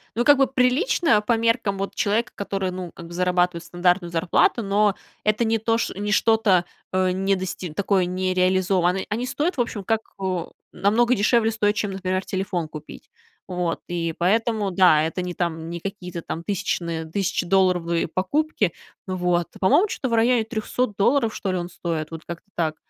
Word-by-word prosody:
но 240 +2 +1
как 290 -1 +7
бы 270 - +4
прилично 255 - +2
по 230 +2 +1
меркам 230 -3 +1
вот 195 +1 -4
человека, 225 +4 0
который, 195 -2 -2
ну, 180 -2 -6
как 170 - -10
бы 170 - -10
зарабатывает 180 -1 +1
стандартную 175 0 0
зарплату, 175 +7 +2
но 205 0 +2 0.3
это 215 +2 +2
не 225 0 +1
то 225 +1 +1
ш 230 - -2
не 205 +1 -2
что-то, 215 -5 +3 0.3
э, 185 0 +2
не 195 +1 +1
дости 185 -2 -5
такое 195 +1 +1
не 185 +1 -1
реализовано. 185 0 +2
Они 230 +4 -2
стоят, 300 +7 -1
в 245 - +3
общем, 215 -4 -3
так, 225 -1 +1 0.2
э, 185 -3 -1 0.3
намного 225 +6 +2
дешевле 225 +1 +3
стоят, 210 -2 +1
чем, 205 -2 -1
например, 185 0 -2
телефон 190 -3 -2
купить. 155 -1 -11 0.4
Вот, 180 -2 -2
и 165 -1 -2
поэтому, 215 +2 +1
да, 175 -4 +5
это 165 +3 -2
не 180 0 -4
там 165 -2 -3
не 170 0 -5
какие-то 180 -2 -6
там 165 - -5
тысячные 170 -4 -2
тысячедолларовые 175 -1 +1
покупки. 210 - 0 0.3
Вот, 180 -2 0
по-моему, 340 - +4
чё-то 260 -8 -3
в - - -2
районе 230 +1 +3
300 220 0 -2
долларов, 230 +2 +2
что 190 -2 -3
ли, - - 0
он 175 0 -4
стоит, 165 -3 -4
вот 165 0 -8
как-то 170 +4 -8
так 160 -2 0
190 Hz, 180 wpm, -23 LUFS, 175-220 Hz, 0.4 s, как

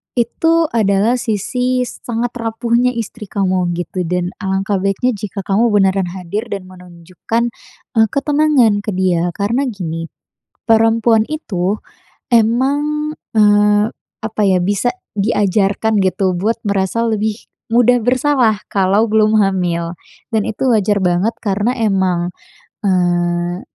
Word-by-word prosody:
itu 245 +7 +1 0.2
adalah 220 +2 +2
sisi 250 +4 -1
sangat 240 -1 -4
rapuhnya 235 +2 0
istri 230 -1 -6
kamu 185 -3 0
gitu 175 +1 -4
dan 180 +1 -1
alangkah 195 0 -1
baiknya 195 +6 0
jika 205 -2 -5
kamu 205 +5 +2
beneran 195 -2 +2
hadir 195 +5 -4
dan 195 -2 -4
menunjukkan 180 +4 -5 0.5
e 225 - +3
ketenangan 285 -7 +2
ke 210 +1 -4
dia, 175 -2 +1
karena 235 +7 0
gini, 165 -7 -4 0.6
perempuan 225 0 +3
itu 205 - -2 0.5
emang, 285 +6 +1 0.2
eee, 210 0 +4 0.3
apa 220 -1 -3
ya, 185 -2 +3
bisa 205 +6 0 0.2
diajarkan 205 +1 +1
gitu 185 -1 0
buat 225 +5 -1
merasa 200 +1 -1
lebih 220 -1 -2 0.2
mudah 245 0 +4
bersalah, 250 -3 +2
kalau 200 +3 +2
belum 215 0 +3
hamil 175 -4 0 0.3
dan 220 -3 0
itu 220 +5 -2
wajar 210 -4 +2
banget, 180 +4 +1
karena 205 +2 0
emang, 190 -5 +1 0.5
eee, 175 -2 0
210 Hz, 120 wpm, -17 LUFS, 185-230 Hz, 0.6 s, eee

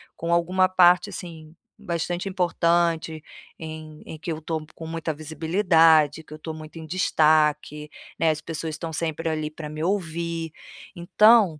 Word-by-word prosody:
com 170 +1 -2
alguma 185 +2 +3
parte, 180 +2 +5
assim, 165 -4 -9 0.3
bastante 175 -1 -3
importante 170 -3 0 0.4
em 155 -1 -9
em 160 - -8
que 165 - -4
eu 160 0 -5
tô 160 -1 -4
com 160 - -8
muita 165 -1 -3
visibilidade, 160 -1 +3
que 155 - -13
eu 155 - -10
tô 160 +1 -6
muito 155 +1 -10
em 160 - -9
destaque, 150 -3 +2 0.3
né, 160 -1 +3
as 150 -1 -4
pessoas 160 0 -5
estão 160 +1 -6
sempre 165 +1 -2
ali 155 -1 -2
pra 155 -1 -8
me 155 +1 -5
ouvir, 170 -3 -2 0.4
então 195 -1 +4
160 Hz, 155 wpm, -24 LUFS, 155-170 Hz, 0.4 s, parte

